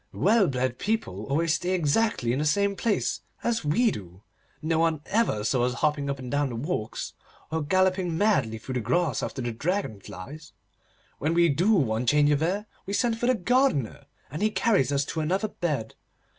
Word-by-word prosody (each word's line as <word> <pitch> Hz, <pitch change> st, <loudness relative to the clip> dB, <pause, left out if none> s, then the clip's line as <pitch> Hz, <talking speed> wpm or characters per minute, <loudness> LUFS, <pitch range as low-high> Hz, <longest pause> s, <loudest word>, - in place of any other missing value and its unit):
Well 210 Hz, 0 st, +3 dB
bred 130 Hz, -2 st, -1 dB
people 185 Hz, -, -2 dB
always 155 Hz, +4 st, +1 dB
stay 180 Hz, +2 st, -1 dB
exactly 155 Hz, -, +1 dB
in 130 Hz, -, -1 dB
the 150 Hz, -, 0 dB
same 200 Hz, +6 st, +2 dB
place, 210 Hz, +2 st, 0 dB, 0.2 s
as 235 Hz, -1 st, 0 dB
we 215 Hz, +11 st, +3 dB
do. 95 Hz, -, -9 dB, 0.4 s
No 160 Hz, +1 st, 0 dB
one 165 Hz, -2 st, +1 dB
ever 210 Hz, -, +1 dB
saw 120 Hz, +3 st, +1 dB
us 125 Hz, 0 st, 0 dB
hopping 145 Hz, +1 st, 0 dB
up 140 Hz, -, -2 dB
and 130 Hz, -2 st, -7 dB
down 145 Hz, -1 st, +1 dB
the 120 Hz, -, -5 dB
walks, 115 Hz, -3 st, -3 dB, 0.4 s
or 160 Hz, 0 st, 0 dB
galloping 185 Hz, +1 st, +1 dB
madly 145 Hz, -, +2 dB
through 125 Hz, +4 st, -7 dB
the 125 Hz, -, 0 dB
grass 135 Hz, +4 st, 0 dB
after 130 Hz, -, -4 dB
dragon 120 Hz, -, -2 dB
flies. 150 Hz, -, -10 dB, 0.7 s
When 160 Hz, +3 st, 0 dB
we 170 Hz, 0 st, +5 dB
do 175 Hz, +10 st, +3 dB
want 120 Hz, -, +2 dB
change 150 Hz, 0 st, +4 dB
of 145 Hz, 0 st, +2 dB
air, 195 Hz, +6 st, 0 dB, 0.2 s
we 200 Hz, -, -3 dB
send 230 Hz, +1 st, +1 dB
for 240 Hz, -, 0 dB
the 255 Hz, -, +4 dB
gardener, 225 Hz, -, +1 dB, 0.3 s
and 150 Hz, -, -5 dB
he 215 Hz, -, +3 dB
carries 200 Hz, -, +2 dB
us 140 Hz, 0 st, +1 dB
to 160 Hz, -, -4 dB
another 190 Hz, +7 st, 0 dB
bed. 145 Hz, -, -3 dB
155 Hz, 190 wpm, -26 LUFS, 130-195 Hz, 0.7 s, we